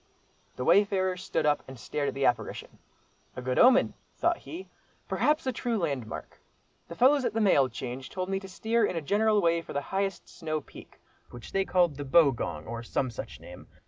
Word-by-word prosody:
The 125 - -4
wayfarer 190 -2 +3
stood 190 -2 -2
up 150 -1 +2
and 135 -1 -9
stared 145 +3 -2
at 135 - -3
the 135 0 0
apparition: 125 - -1 0.6
"a 130 - -5
good 130 0 0
omen," 255 +1 +6 0.2
thought 345 0 +1
he, 355 +3 -9 0.4
"perhaps 305 0 +1
a 260 - +1
true 235 -1 -2
landmark. 135 - -4 0.5
The 170 - -8
fellows 270 +6 +4
at 230 - -1
the - - +2
mail 145 -11 +4
change 125 +2 -6
told 185 -1 -4
me 195 0 -1
to 195 0 -10
steer 225 +4 0
in 205 - 0
a 165 - -1
general 210 +5 +2
way 170 0 +3
for - - -9
the 140 - -1
highest 195 -1 -1
snow 155 -2 -4
peak, - - -15 0.3
which 120 - -11
they 195 0 +1
called 175 -7 +2
'the 145 - -5
Bogong,' 130 - +2
or 115 0 -5
some 125 +2 -2
such 95 - -8
name. - - -12
170 Hz, 200 wpm, -28 LUFS, 135-205 Hz, 0.6 s, omen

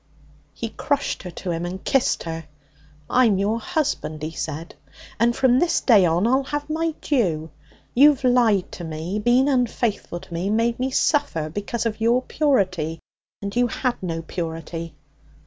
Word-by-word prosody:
He 230 - -4
crushed 285 +5 -1
her 180 - -7
to 175 +1 -5
him 165 0 -2
and 180 +2 -5
kissed 270 -2 +1
her. 165 -1 -5 0.6
'I'm 230 -3 +4
your 210 +4 0
husband,' 300 - -2
he 155 - -3
said, 160 +1 -5 0.5
'and 235 +1 +3
from 260 -1 +4
this 340 +1 +2
day 205 -8 +5
on 170 +4 +2
I'll 260 +3 +2
have 290 +1 -3
my 325 0 -1
due. 165 - 0 0.4
You've 280 +1 +5
lied 235 -6 +3
to 175 - -8
me, 165 +5 -4
been 245 +5 +3
unfaithful 240 -8 0
to - - -12
me, 175 +4 -2
made 230 +3 +1
me 260 +1 0
suffer 260 - +1
because 205 +6 -3
of 220 -1 -2
your 240 +3 +3
purity 185 - 0 0.4
and 200 +2 -4
you 245 0 +3
had 245 +1 -2
no 165 -3 -3
purity. 165 0 -5
220 Hz, 165 wpm, -23 LUFS, 170-255 Hz, 0.6 s, day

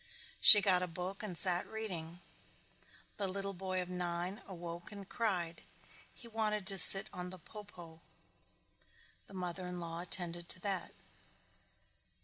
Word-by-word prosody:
She 210 -2 +10
got 185 -2 +1
a 180 - -3
book 180 +3 -8
and 185 -5 -7
sat 180 0 0
reading. 175 -6 -8 1.0
The 200 - -3
little 195 +1 -5
boy 185 0 -5
of - - -12
nine 180 +1 -5
awoke 175 -1 -10
and 200 -2 -12
cried. 180 -8 -4 0.5
He 235 - -15
wanted 215 -3 -4
to 195 0 +2
sit 195 +3 +10
on 180 0 -7
the 185 - -11
po 210 +5 -13
po. 165 -5 -15 1.3
The 195 - -15
mother 180 0 -6
in 180 0 -8
law 165 -1 -7
attended 175 -1 -5
to - - +5
that. 195 -3 -5
180 Hz, 145 wpm, -32 LUFS, 175-195 Hz, 1.3 s, She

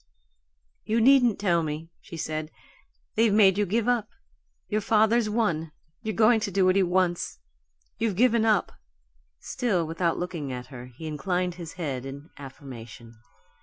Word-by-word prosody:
"You 225 +2 0
needn't 245 -2 +5
tell 175 -4 +2
me," 155 +1 -5
she 165 - -10
said. 155 -1 -3 0.6
"They've 225 0 +3
made 200 -2 +5
you 205 - +1
give 220 +5 0
up. 240 -3 +1 0.6
Your 215 0 -1
father's 220 +1 +3
won 170 -8 0 0.3
you're 220 -2 -3
going 225 +1 +5
to 215 -1 -2
do 195 -1 +2
what 185 0 +4
he 195 - +4
wants. 180 -1 0 0.6
You've 220 -4 0
given 235 +1 +3
up." 215 -3 +2 0.7
Still 195 -9 -1
without 165 +1 -1
looking 170 -6 -4
at 125 -1 -5
her, 125 0 -8
he 125 +6 -11
inclined 180 +3 -1
his 170 -2 -9
head 140 -8 -4
in 140 +3 -10
affirmation. 120 -4 -11
180 Hz, 155 wpm, -26 LUFS, 155-215 Hz, 0.7 s, needn't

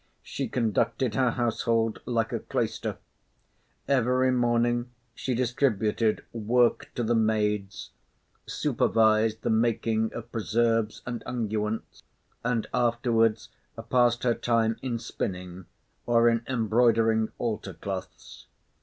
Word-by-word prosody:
She - - -4
conducted 115 +1 0
her 125 +3 +2
household 115 -1 0
like 115 -2 0
a - - -1
cloister. - - -3 0.9
Every 130 -1 +2
morning 120 0 +1 0.2
she 125 +1 -3
distributed 115 -3 0
work 120 +2 +1
to 120 - -1
the 115 +1 +1
maids, 105 -3 0 0.6
supervised 110 0 +2
the - - +1
making 110 0 +1
of 120 0 -7
preserves 115 0 0
and 120 -1 -4
unguents, 110 -2 -3 0.4
and 120 -2 0
afterwards 115 -2 +1 0.4
passed 120 -1 +3
her 120 -2 +3
time 115 -1 +1
in 125 -3 -2
spinning, 90 -4 -5 0.4
or 120 0 +4
in 115 -1 +3
embroidering 115 -2 +2
altar 115 -3 -3
cloths. 95 -2 -7
115 Hz, 110 wpm, -27 LUFS, 110-120 Hz, 0.9 s, or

